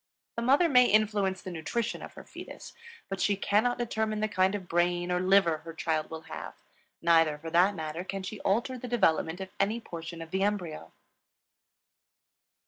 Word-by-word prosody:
The 235 - -2
mother 275 +8 +4
may 250 -5 +6
influence 205 -3 +2
the 185 - -6
nutrition 210 +8 -3
of - - -10
the - - -10
fetus; - - -10 0.3
but 195 -2 -4
she 205 - +3
cannot 215 +5 +1
determine 220 -2 -1
the 215 - +1
kind 190 -1 +2
of 190 -3 -6
brain 175 +1 +1
or 180 - +1
liver 185 -4 +4
her 165 +1 -10
child 160 -1 -1
will 160 0 -7
have; - - -8 0.5
neither 165 -3 +4
for 165 +2 -8
that 180 +4 +4
matter 160 +1 -4
can 195 0 -5
she 205 +2 -6
alter 240 +6 0
the 250 - -6
development 180 -7 +1
of 190 0 -7
any 210 +4 +1
portion 170 -5 -8
of 165 0 -9
the 190 - -1
embryo. 180 - -2
190 Hz, 180 wpm, -29 LUFS, 165-215 Hz, 0.5 s, may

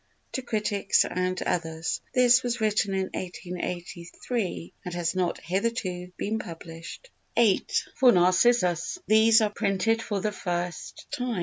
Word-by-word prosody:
To 260 - -3
Critics 210 -4 +1
and 185 0 -1
Others. 165 -1 -2
This 250 0 +5
was 245 -1 -2
written 210 -2 +1
in 190 -1 -1
1883 180 +3 -5
and 180 -2 -5
has 170 -1 -1
not 185 -2 -1
hitherto 185 -2 -2
been 220 +2 -2
published. 165 - -9 0.3
viii. 225 -5 +4 0.4
For 255 -2 +7
Narcissus 185 - +3
These 220 +1 +6
are 210 -1 +1
printed 205 +3 +1
for 205 -3 -2
the 210 +2 -1
first 175 -3 -4
time. 245 -5 -2
195 Hz, 130 wpm, -27 LUFS, 175-225 Hz, 0.4 s, For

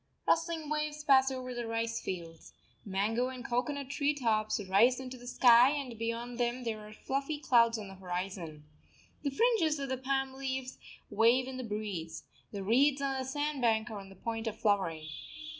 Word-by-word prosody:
Rustling 330 -2 +1
waves 300 0 -2
pass 270 -2 +5
over 255 -1 -5
the 240 -1 -4
rice 230 0 -2
fields. 165 -3 -7 0.3
Mango 215 +5 0
and 255 -2 -7
cocoanut 270 +3 -2
tree 290 +1 +1
tops 220 -6 +1
rise 230 +7 +4
into 260 -1 -7
the 245 -1 -12
sky, 245 0 +7
and 275 -5 -4
beyond 235 +1 -3
them 240 +1 0
there 225 -2 -3
are - - -11
fluffy 275 +7 -3
clouds 235 -5 +4
on 210 -2 -6
the 195 - -9
horizon. 180 -4 -5 0.6
The 285 - 0
fringes 345 - +2
of 275 -1 -4
the 260 - -1
palm 270 0 -1
leaves 265 -1 -4 0.3
wave 230 +5 +4
in 260 -1 -6
the 255 - -4
breeze. 205 -7 -4 0.3
The 200 -2 -5
reeds 270 +7 +4
on 275 -1 -1
the - - -2
sand 290 +1 -2
bank 225 -1 +2
are 210 - -5
on 195 -1 -11
the 195 - -13
point 225 +3 -4
of 220 0 -3
flowering. 190 -8 0
245 Hz, 185 wpm, -32 LUFS, 215-270 Hz, 0.6 s, sky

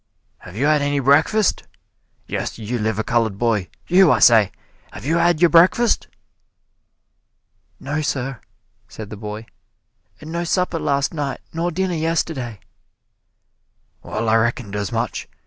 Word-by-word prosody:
"Have 90 - -13
you 130 +6 0
had 150 -1 +3
any 145 0 0
breakfast? 155 - +2 0.6
Yes, - - -4
you 115 +2 -4
liver 110 0 -1
colored 115 -4 0
boy 105 -5 0 0.2
you, 180 -2 +5
I - - +4
say, 110 -5 +5 0.4
have - - -9
you 160 +4 +1
had 170 -1 +2
your 175 - +5
breakfast?" 185 +8 +4 1.7
"No, 145 +3 -3
sir," 135 -4 -3 0.5
said 110 -1 -10
the - - -6
boy; 105 +1 -7 0.7
"and 155 +1 -10
no 170 +1 -2
supper 180 -1 0
last 140 +1 0
night 145 -4 -3
nor 165 +2 -1
dinner 185 +2 -2
yesterday!" 155 - -2 1.4
"Well, 110 +2 -4
I 110 +1 +4
reckoned 115 -2 -1
as 100 -2 -3
much. - - -3
140 Hz, 140 wpm, -20 LUFS, 110-165 Hz, 1.7 s, you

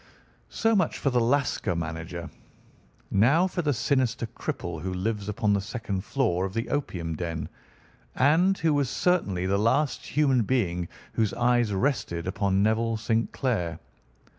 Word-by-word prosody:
"So 225 -1 +1
much 185 -5 +1
for 140 - 0
the 125 - +3
Lascar 125 -6 +1
manager. 85 +1 -4 0.8
Now 135 - +4
for 180 -1 -2
the 150 -3 +1
sinister 130 -2 +1
cripple 85 -7 -5
who 95 +2 -3
lives 105 +2 -2
upon 105 0 +1
the 100 - +1
second 100 -2 -4
floor 110 -9 0
of 95 +1 -4
the 115 +1 -2
opium 85 - -2
den, 80 -2 -4 0.7
and 170 +8 +4
who 160 -2 +2
was 140 -3 +1
certainly 105 - +1
the 100 +1 +1
last 135 +7 +1
human 135 -4 +3
being 95 -7 0 0.3
whose 110 -3 0
eyes 120 -2 +2
rested 95 - -1
upon 95 +1 +1
Neville 110 +1 +1
St. 115 +1 0
Clair. 105 -11 -1
110 Hz, 150 wpm, -27 LUFS, 95-135 Hz, 0.8 s, Now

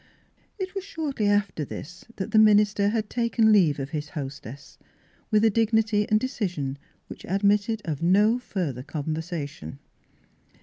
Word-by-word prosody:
It 375 -2 -5
was 390 -2 -4
shortly 300 - -3
after 205 -6 +1
this 170 +5 -9
that 190 - -5
the 215 - +5
min 215 -1 +7
ister 205 -1 +1
had 220 -1 -1
taken 230 -1 +2
leave 175 -9 +4
of 135 +1 -5
his 150 -1 -4
hostess, 140 -3 -8 0.5
with 215 0 +3
a 220 - +4
dignity 220 -1 +1
and 215 - +4
decision 175 - -3 0.3
which - - -11
admitted 205 +3 +1
of 155 -4 -3
no 205 +7 +3
further 170 - -4
conversation. 155 - -5
205 Hz, 145 wpm, -25 LUFS, 155-220 Hz, 0.5 s, min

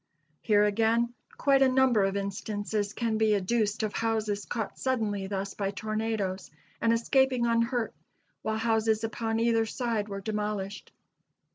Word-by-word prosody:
Here, 210 -2 +4
again, 225 +3 +2 0.2
quite 275 -1 +3
a 265 - +6
number 255 -5 +4
of 195 +1 -1
instances 205 +1 -2
can 225 -2 -1
be 215 -1 +4
adduced 210 +2 0
of 215 - -1
houses 215 -3 -1
caught 225 -4 -4
suddenly 215 -7 -1
thus 195 0 -3
by 195 -1 -2
tornadoes 215 -2 -2 0.3
and 230 - +3
escaping 255 +1 +2
unhurt, 230 0 +1 0.5
while 220 0 -1
houses 220 -1 +1
upon 225 0 -1
either 225 -1 +2
side 225 -3 -2
were 200 0 -4
demolished. 210 -1 -3
220 Hz, 140 wpm, -28 LUFS, 205-230 Hz, 0.5 s, a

